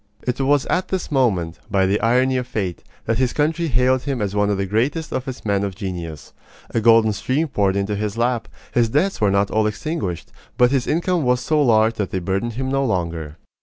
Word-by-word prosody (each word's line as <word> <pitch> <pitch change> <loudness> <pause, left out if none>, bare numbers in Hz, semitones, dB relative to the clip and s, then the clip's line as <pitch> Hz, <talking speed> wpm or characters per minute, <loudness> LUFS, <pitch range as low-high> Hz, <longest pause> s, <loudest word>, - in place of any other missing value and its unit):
It 125 +2 -2
was 140 0 +2
at 185 - 0
this 190 -4 -3
moment, 95 - +1
by 95 -2 +2
the 100 +2 +1
irony 125 +4 +3
of 125 -1 -3
fate, 100 -8 -3 0.2
that 115 +1 0
his 130 -2 +1
country 160 +3 0
hailed 130 -1 +2
him 135 -2 -3
as 100 -2 -2
one 105 0 +2
of 100 - +1
the 100 - -1
greatest 130 - -1
of 130 0 -3
its 130 -3 -7
men 100 -1 +1
of 100 -2 -3
genius. 90 -6 -6 0.4
A 115 - 0
golden 115 -1 +5
stream 135 +10 -1
poured 100 -8 +1
into 100 +1 -1
his 105 +1 -3
lap. 120 -1 0 0.3
His 120 -2 +3
debts 155 - 0
were 105 - +4
not 100 +1 +1
all 110 0 +2
extinguished, 110 - -4 0.3
but 125 0 +4
his 135 -3 0
income 175 +2 +1
was 125 -2 +2
so 155 +3 +1
large 110 -4 +4
that 100 -3 -1
they - - -3
burdened 95 +6 -2
him 130 +3 -3
no 135 0 +1
longer. 85 - -2
115 Hz, 220 wpm, -21 LUFS, 100-130 Hz, 0.4 s, golden